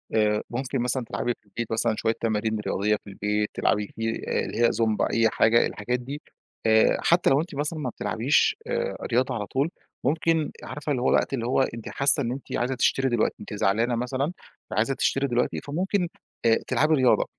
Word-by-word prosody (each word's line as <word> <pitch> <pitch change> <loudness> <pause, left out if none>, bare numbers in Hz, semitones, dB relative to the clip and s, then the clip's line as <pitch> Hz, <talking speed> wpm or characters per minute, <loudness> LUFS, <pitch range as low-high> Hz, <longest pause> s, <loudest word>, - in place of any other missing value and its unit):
آآ، 105 -1 +3
ممكن 130 +2 -2
مثلًا 125 +1 0
تلعبي 120 - -1
في - - -42
البيت 115 +3 -5
مثلًا 110 0 +1
شوية 115 - +1
تمارين 110 -1 0
رياضية 105 0 0
في - - -19
البيت، 105 +1 -1
تلعبي 105 -1 +1
فيه، 115 0 -1 0.2
آآ، - - 0
اللي - - -6
هي - - +4
زومبا، 110 -2 0
أي 115 -1 +4
حاجة، 115 +2 +4
الحاجات 125 +4 -3
دي 140 +5 -7 0.4
آآ، 110 0 +5
حتى 170 +1 +3
لو 135 +2 +4
أنتِ 165 -2 -7
مثلًا 150 +3 -2
ما 135 -4 -2
بتلعبيش، 125 +4 +1
آآ، 485 0 -2
رياضة 125 +2 +1
على 105 -3 -3
طول، 135 +8 0 0.3
ممكن 160 0 +1
عارفة 150 0 -5
اللي 130 -4 0
هو - - +2
وقت - - +2
اللي 120 -4 -1
هو 130 +2 +2
أنتِ 115 -3 -3
حاسّة 140 +1 +4
إن 120 - -2
أنتِ 130 +2 -4
عايزة 130 +2 -1
تشتري 135 +1 +2
دلوقتي، 120 -3 +1
أنتِ - - -8
زعلانة 110 +4 +1
مثلًا 130 +6 -2 0.4
فعايزة 110 +7 +1
تشتري 135 +1 +1
دلوقتي، 125 -1 0
فممكن، 180 +5 -1 0.4
آآ، 115 -1 +6
تلعبي 155 +2 +2
رياضة، 130 -3 +3
125 Hz, 195 wpm, -25 LUFS, 110-140 Hz, 0.4 s, آآ